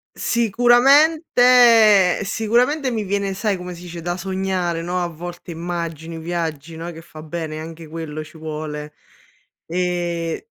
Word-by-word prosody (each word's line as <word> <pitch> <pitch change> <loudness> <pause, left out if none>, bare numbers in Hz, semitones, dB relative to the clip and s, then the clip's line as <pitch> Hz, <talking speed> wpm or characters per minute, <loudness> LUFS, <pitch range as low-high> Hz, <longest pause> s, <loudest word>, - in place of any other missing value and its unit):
Sicuramente 245 - +5
sicuramente 245 +7 +1
mi 220 -2 -2
viene 200 0 -1
sai, 200 0 -1
come 180 0 -7
si 175 - -12
dice, 170 -1 -8
da 175 +2 -3
sognare, 185 -2 -2
no, 180 +1 -2
a 175 - -1
volte 175 +1 -8
immagini, 165 -1 -5
viaggi, 165 -2 -4
no, 170 +2 -6
che 165 0 -11
fa 155 -1 -12
bene, 155 -1 -5
anche 165 0 -9
quello 155 -1 -6
ci 155 +1 -15
vuole. 150 -1 -6 0.7
Ehm 175 -1 -2
175 Hz, 135 wpm, -21 LUFS, 165-210 Hz, 0.7 s, Sicuramente